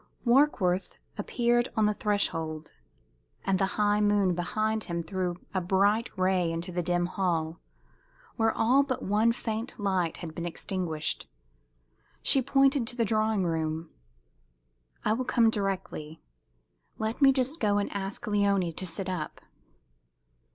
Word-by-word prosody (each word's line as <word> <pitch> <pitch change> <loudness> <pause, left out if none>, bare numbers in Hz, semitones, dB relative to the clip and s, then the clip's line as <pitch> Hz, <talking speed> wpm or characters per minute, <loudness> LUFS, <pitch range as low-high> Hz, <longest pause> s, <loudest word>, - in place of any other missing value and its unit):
Warkworth 235 -8 +2 0.2
appeared 240 -1 +1
on 215 - +4
the 210 - +2
threshold, 165 -7 -1 0.7
and 190 -1 +2
the 195 - +2
high 210 0 +3
moon 205 -3 +3
behind 215 +5 -1
him 170 -1 -3
threw 180 +1 -2 0.2
a 190 - 0
bright 200 +5 +2
ray 185 -2 +2
into 170 +2 -4
the 175 0 -1
dim 175 0 +1
hall, 170 -3 -1 0.8
where 225 -1 +2
all 255 +5 +4
but 270 -3 -2
one 215 +4 +3
faint 230 0 -4
light 190 -5 0
had 165 -3 -7
been 170 +1 -4
extinguished. 170 -3 -3 0.9
She 270 - +4
pointed 270 -1 +3
to 240 - -4
the 235 -2 +1
drawing 215 -1 +1
room. 160 -1 -2 1.1
"I 215 - +3
will 250 +3 -1
come 235 -3 +3
directly. 190 -7 -3 0.8
Let 220 +5 -3
me 275 -1 +8
just 270 +4 0
go 205 -2 +2
and 205 - -1
ask 195 +3 -4
Léonie 200 -5 +1
to 185 - -3
sit 185 +3 -4
up." 180 -4 -4
200 Hz, 140 wpm, -28 LUFS, 175-225 Hz, 1.1 s, me